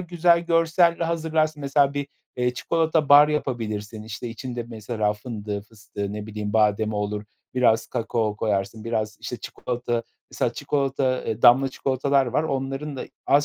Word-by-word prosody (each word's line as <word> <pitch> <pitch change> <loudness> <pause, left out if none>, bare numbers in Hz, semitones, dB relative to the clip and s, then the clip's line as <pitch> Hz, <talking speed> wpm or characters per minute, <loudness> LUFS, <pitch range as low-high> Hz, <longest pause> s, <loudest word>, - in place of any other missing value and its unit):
güzel 175 -1 +3
görselle 170 0 +3
hazırlarsın 160 -2 0
mesela 140 0 +2
bir, 140 -1 -2 0.3
eee, 125 0 0
çikolata 160 0 +1
bar 145 +1 +8
yapabilirsin, 110 -7 -3
işte, 110 +2 -6
içinde 120 +1 -5
mesela 110 -2 -1
fındığı, 105 -2 -5
fıstığı, 105 -1 -7
ne 105 0 -5
bileyim, 105 -1 -4
bademi 110 0 +2
olur, 105 0 -2 0.3
biraz 115 -3 +3
kakao 115 -3 -1
koyarsın, 105 +1 -1
biraz, 110 -2 -2
işte - - -5
çikolata 120 -1 -3 0.3
mesela - - -1
çikolata, 135 -2 0
eee, 110 +1 -3
damla 130 +3 +7
çikolatalar 135 0 +1
var 130 +6 +1
onların 135 0 -3
da - - -4 0.2
az 140 +2 +4
125 Hz, 145 wpm, -24 LUFS, 110-145 Hz, 0.3 s, bar